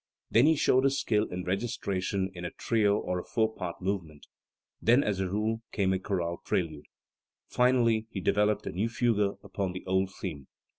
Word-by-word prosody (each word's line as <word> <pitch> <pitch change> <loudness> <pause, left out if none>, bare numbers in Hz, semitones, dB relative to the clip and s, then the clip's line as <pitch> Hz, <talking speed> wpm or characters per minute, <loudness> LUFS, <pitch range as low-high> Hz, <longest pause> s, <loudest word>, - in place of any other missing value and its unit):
Then 120 +6 +6
he 160 - +5
showed 130 -2 +3
his 135 0 +2
skill 105 -4 +1
in 90 -2 -5
registration 95 -1 -2
in 90 -1 -8
a 85 - -2
trio 105 -1 +1
or 90 -3 -2
a - - -6
four 110 -1 0
part 90 -5 -5
movement; 85 -6 -3 0.6
then, 125 +5 +5
as 100 -3 -1
a 95 -1 -1
rule, 110 +3 -1
came 95 -2 +1
a 95 - 0
chorale 90 -3 -2
prelude. 80 -5 -2 0.6
Finally 120 -3 +2
he 100 - -5
developed 105 +2 +1
a - - -3
new 105 +6 -1
fugue 110 -4 +1
upon 95 -2 -3
the 90 - -7
old 95 0 +1
theme. 80 -9 -6
100 Hz, 185 wpm, -29 LUFS, 90-110 Hz, 0.6 s, Then